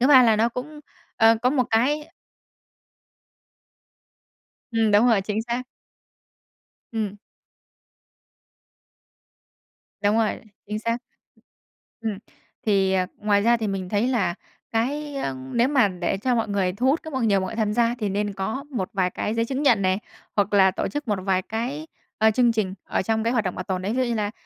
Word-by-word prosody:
Thứ 255 - +4
ba 265 -3 +8
là 225 -3 +4
nó 225 +2 +3
cũng, 295 +6 -7 0.4
ờ, 225 +1 +6
có 250 - +4
một 260 -3 +2
cái 290 +7 +1 2.6
Ừm, 225 -2 +2
đúng 210 +4 +5
rồi, 225 -5 +4
chính 210 +2 -2
xác. 240 +2 -2 1.3
Ừm. 210 -3 -3 2.9
Đúng 210 +2 +3
rồi, 220 -2 +1 0.3
chính 210 +1 -3
xác, 230 +1 -1 1.0
ừm. 215 -3 -2 0.5
Thì, 195 -2 +3
ờ, 185 -1 +2
ngoài 205 -1 +2
ra 235 +3 +4
thì 220 -2 -2
mình 190 -2 -3
thấy 210 +4 +1
là 220 -9 +1 0.4
cái, 285 +6 -1
ơ, 135 - -2 0.2
nếu 235 +2 +3
mà 265 -7 +4
để 180 +1 -2
cho 245 +5 0
mọi 225 -1 0
người 190 -3 0
thu 235 +6 -2
hút 295 +5 +3
các 315 - -8
nhiều 225 -7 +2
mọi 190 - -4
tham 215 -2 0
gia 235 +1 +2
thì 210 -3 -1
nên 205 +1 -1
có 220 +9 -3
một 190 -8 -2
vài 185 -2 +1
cái 210 - -3
giấy 230 0 +1
chứng 270 +3 -2
nhận 230 -8 +4
này, 185 0 +2 0.4
hoặc 205 0 +1
là 190 -2 +6
tổ - - -2
chức 290 -2 -5
một 205 -3 0
vài 190 -1 +2
cái, 250 - -4 0.3
ờ, 220 +1 +4
chương 240 +1 +3
trình 205 -4 -1
ở - - -1
trong 220 +3 0
cái 230 - +1
hoạt 225 -5 +1
động 185 - -2
bảo 185 - -4
tồn 185 -1 -2
đấy, 195 - -2
ví - - -2
dụ 260 - +3
như 240 -1 -1
là, 210 -1 -1
220 Hz, 185 wpm, -24 LUFS, 200-245 Hz, 2.9 s, ba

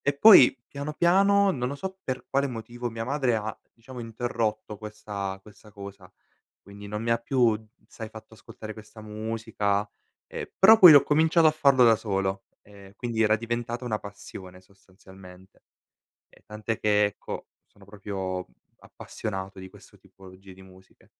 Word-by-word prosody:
E 145 0 -1
poi 140 - +8
piano 145 +2 -6
piano, 195 +4 +3
non 125 -7 -2
lo 140 - -5
so 190 +6 -7
per 130 -1 -4
quale 140 +1 +1
motivo, 120 0 -6
mia 115 0 -5
madre 130 -1 0
ha 110 0 -5 0.2
diciamo 125 +2 -12
interrotto 115 -2 -4
questa 105 -3 -6
questa 105 +1 -17
cosa, 100 -2 -11 0.5
quindi 100 +1 -12
non 105 +1 -5
mi 115 - -2
ha 115 - +4
più, 115 -2 +1 0.3
sai, 110 -2 -9
fatto 110 0 -13
ascoltare 110 0 -10
questa 110 0 -13
musica, 105 -1 -3 0.4
ehm, - - -7
però 220 +3 +8
poi 175 -6 +10
ho 145 - +8
cominciato 160 +2 +3
a - - +6
farlo 140 -5 +4
da 115 -1 +6
solo, 95 -2 -2 0.2
ehm, 100 -1 -16
quindi 115 -2 -2
era 110 0 +3
diventata 120 +2 -4
una 110 -3 -2
passione 95 -2 -11
sostanzialmente. 95 0 -18 0.7
E - - -23
tant'è 105 +1 -5
che 105 0 +2
ecco, 100 - -7 0.2
sono 100 - -21
proprio 95 -2 -5 0.3
appassionato 95 -1 -7
di 95 0 -10
questo - - -18
tipologie 95 0 -16
di 95 - -17
musiche. 95 0 -20
110 Hz, 160 wpm, -26 LUFS, 100-125 Hz, 0.7 s, poi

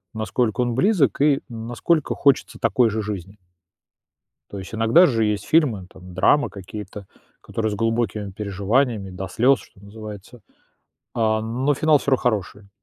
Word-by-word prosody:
насколько 110 +2 -1
он 120 -1 0
близок 145 - +2
и 145 -2 +4
насколько 120 +7 -1
хочется 140 -2 +1
такой 120 -3 +2
же 110 +1 -2
жизни. 100 -1 -6 1.1
То 100 - -7
есть 95 +3 -8
иногда 115 +11 +5
же 115 -4 +1
есть 105 -1 -1
фильмы, 125 - +2
там 90 -1 -13
драма 145 +10 +3
какие-то, 100 0 -9 0.3
которые 110 -2 -3
с - - -2
глубокими 110 -2 -1
переживаниями, 100 +2 -1
до 95 +1 -6
слёз, 125 +7 +3
что 95 - -19
называется, 105 +2 -10 0.7
а, 110 -1 +1
но 125 +6 0
финал 155 +1 +3
всё 140 - -3
равно 130 - +5
хороший. 105 -3 -2
110 Hz, 150 wpm, -22 LUFS, 100-125 Hz, 1.1 s, иногда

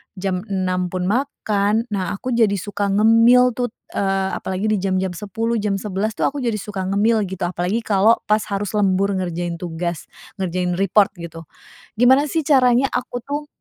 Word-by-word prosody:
jam 185 -1 -2
6.00 185 -2 -1
pun 185 -1 -2
makan, 215 -2 0
nah 195 0 -2
aku 255 +5 -5
jadi 215 -4 +3
suka 205 +1 -3
ngemil 230 +4 +5
tuh, 245 -3 -2 0.2
eee, 195 -1 0
apalagi 190 +3 -3
di 210 - +2
jam-jam 190 -1 -1
10.00, 225 +5 -3
jam 205 -1 -1
11.00 210 +2 -2
itu - - -2
aku 285 0 -4
jadi 230 -3 0
suka 195 -1 -5
ngemil 210 +2 +2
gitu. 190 -1 -6
Apalagi 180 +5 -1
kalau 210 +2 +3
pas 215 +1 +3
harus 200 0 -2
lembur 200 -1 +2
ngerjain 175 -2 -3
tugas, 170 -1 -4 0.3
ngerjain 180 -1 -1
report 195 +1 +3
gitu. 165 -1 -8 0.6
Gimana 265 +4 +5
sih 320 -2 0
caranya 260 -2 +4
aku 245 0 -3
tuh 295 +1 -4
200 Hz, 170 wpm, -20 LUFS, 185-230 Hz, 0.6 s, ngemil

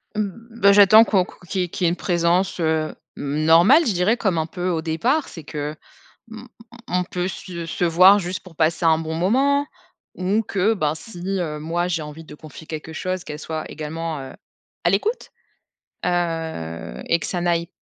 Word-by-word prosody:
Mmh, 225 +3 -5
bah, 200 0 +7
j'attends 205 +2 +8
qu'on 195 -5 +2
qu'on - - -16
qu'il 190 +2 -1
y - - +2
ait - - -8
qu'il 180 - -2
y - - +5
ait - - +4
une 170 - -1
présence, 175 +1 +1
heu, 160 -1 0 0.2
normale, 165 - +4
je 220 - +1
dirais. 180 +7 +2
Comme 190 -7 0
un 160 - 0
peu 180 +2 -4
au 165 -3 0
départ. 235 - 0
C'est 165 - -10
que, 150 0 -5 0.6
hem, 225 +2 -10 0.4
on - - -4
on - - -2
peut 180 +1 -3
se 175 -2 -7
se 170 +2 -2
voir 185 +4 +7
juste 180 0 -4
pour 175 -4 -15
passer 165 +1 +1
un 160 -1 +5
bon 160 0 -4
moment 270 - +2 0.5
ou 195 +5 0
que, 205 +1 +1
ben, 155 -6 0
si, 175 +3 -11 0.2
heu, 150 -3 -3
moi 170 +3 -1
j'ai 165 -3 -1
envie 150 +2 -9
de - - -12
confier 155 +1 -12
quelque 155 0 -7
chose, 185 +2 -3
qu'elle 150 0 -7
soit 155 0 -5
également, 160 0 -4
heu, 135 - -8 0.5
à - - +4
l'écoute. 445 +4 -1 0.7
Heu 160 - -3
et 170 - +2
que - - -4
ça 175 - -2
n'aille 170 0 0
175 Hz, 200 wpm, -22 LUFS, 160-195 Hz, 0.7 s, j'attends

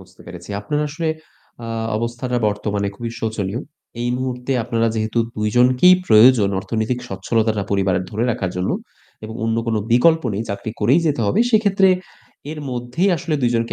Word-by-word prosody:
বুঝতে - - -18
পেরেছি। 90 +2 -10
আপনার 150 +9 -2
আসলে 160 +2 -3 0.6
আ - - -6 0.3
অবস্থাটা 120 +2 -2
বর্তমানে 105 -1 -2
খুবই 115 -1 -5
শোচনীয়। 110 0 -2 0.4
এই 120 - -1
মুহূর্তে 125 0 -3
আপনারা 115 -1 0
যেহেতু 110 +1 -1 0.2
২ 105 0 0
জন 125 +1 +6
কি 180 - +7 0.2
প্রয়োজন 110 -1 +6
অর্থনৈতিক 110 +4 -2
স্বচ্ছলতাটা 110 +2 0
পরিবারে 95 -2 +1
ধরে 110 +3 -1
রাখার 95 -5 -2
জন্য 90 0 -1 0.5
এবং 110 +1 -7
অন্য 115 0 0
কোনো 110 -2 +1
বিকল্প 160 +6 +4
নেই, 105 - -2
চাকরি 100 +2 -4
করেই 125 +10 +4
যেতে 145 -5 0
হবে। 100 - +2
সেক্ষেত্রে 200 -4 +4 0.6
এর 155 - -6
মধ্যেই 125 +10 0
আসলে 155 0 -3
২ 120 - +3
জনকে 115 0 0
115 Hz, 165 wpm, -20 LUFS, 105-130 Hz, 0.6 s, কি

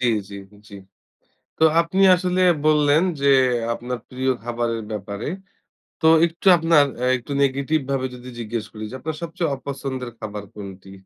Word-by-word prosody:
জি, 125 - +1 0.2
জি, - - -8 0.3
জি। 100 - -12 0.8
তো 160 - +2 0.2
আপনি 185 +3 -1
আসলে 180 0 -1 0.2
বললেন 150 0 +4 0.2
যে, 140 - +1 0.5
আপনার 125 +1 -5
প্রিয় 130 +1 -2
খাবারের 120 -1 -2
ব্যাপারে। 100 0 -5 0.7
তো 160 - -3 0.2
একটু 170 +3 -4
আপনার 165 -2 +4
অ্যা 125 +1 -1
একটু 120 +4 -11
নেগেটিভ 140 +3 +1
ভাবে 130 -1 0
যদি 125 +1 -11
জিজ্ঞেস 115 -1 -4
করি 110 -1 -8
যে, - - -11
আপনার 155 +2 -5
সবচেয়ে 165 -2 -2
অপছন্দের 130 -2 -5
খাবার 105 -2 -6
কোনটি? 95 -2 -10
130 Hz, 150 wpm, -22 LUFS, 115-155 Hz, 0.8 s, বললেন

